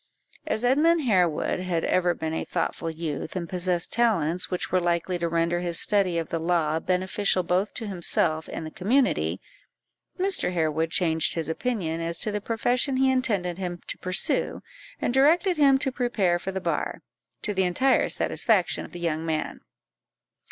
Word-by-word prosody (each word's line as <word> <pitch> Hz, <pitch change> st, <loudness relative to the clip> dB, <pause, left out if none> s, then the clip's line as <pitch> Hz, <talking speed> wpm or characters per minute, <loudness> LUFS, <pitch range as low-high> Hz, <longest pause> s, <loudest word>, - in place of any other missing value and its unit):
As 220 Hz, -, -1 dB
Edmund 310 Hz, +7 st, +3 dB
Harewood 180 Hz, -, +1 dB
had 180 Hz, -3 st, -1 dB
ever 175 Hz, -1 st, +2 dB
been 160 Hz, 0 st, -4 dB
a -, -, -2 dB
thoughtful 165 Hz, -, -3 dB
youth, 160 Hz, 0 st, -5 dB
and 175 Hz, -2 st, -3 dB
possessed 180 Hz, -1 st, -1 dB
talents 180 Hz, -8 st, +2 dB
which 180 Hz, -, -3 dB
were 185 Hz, -, +3 dB
likely 175 Hz, +1 st, -1 dB
to 170 Hz, 0 st, -1 dB
render 170 Hz, +1 st, 0 dB
his 175 Hz, -1 st, 0 dB
study 195 Hz, -5 st, +2 dB
of 165 Hz, -2 st, -3 dB
the 165 Hz, -, -2 dB
law 160 Hz, -2 st, +1 dB
beneficial 185 Hz, +2 st, 0 dB
both 180 Hz, +4 st, 0 dB
to 230 Hz, -, -4 dB
himself 170 Hz, -4 st, -1 dB
and 160 Hz, -, -5 dB
the 155 Hz, -, -7 dB
community, 250 Hz, -, +1 dB, 0.8 s
Mr. 380 Hz, -, +1 dB
Harewood 160 Hz, -1 st, 0 dB
changed 160 Hz, -2 st, +1 dB
his 165 Hz, -2 st, -1 dB
opinion 165 Hz, -4 st, -2 dB
as 165 Hz, 0 st, -2 dB
to 215 Hz, -, 0 dB
the 210 Hz, 0 st, -3 dB
profession 245 Hz, +5 st, 0 dB
he 265 Hz, 0 st, +3 dB
intended 200 Hz, -9 st, 0 dB
him 175 Hz, -2 st, -4 dB
to -, -, -5 dB
pursue, 185 Hz, 0 st, 0 dB, 0.4 s
and -, -, -1 dB
directed 330 Hz, +7 st, +3 dB
him 275 Hz, -3 st, +5 dB
to 265 Hz, 0 st, -1 dB
prepare 215 Hz, -9 st, 0 dB
for 190 Hz, -, -4 dB
the 190 Hz, -, -3 dB
bar, 165 Hz, -2 st, -3 dB, 0.4 s
to 210 Hz, -, -2 dB
the 190 Hz, -1 st, +1 dB
entire 255 Hz, +10 st, +2 dB
satisfaction 205 Hz, -7 st, +2 dB
of -, -, -14 dB
the 175 Hz, -, -7 dB
young 165 Hz, -2 st, -1 dB
man. 160 Hz, -1 st, -3 dB
180 Hz, 175 wpm, -25 LUFS, 165-225 Hz, 0.8 s, him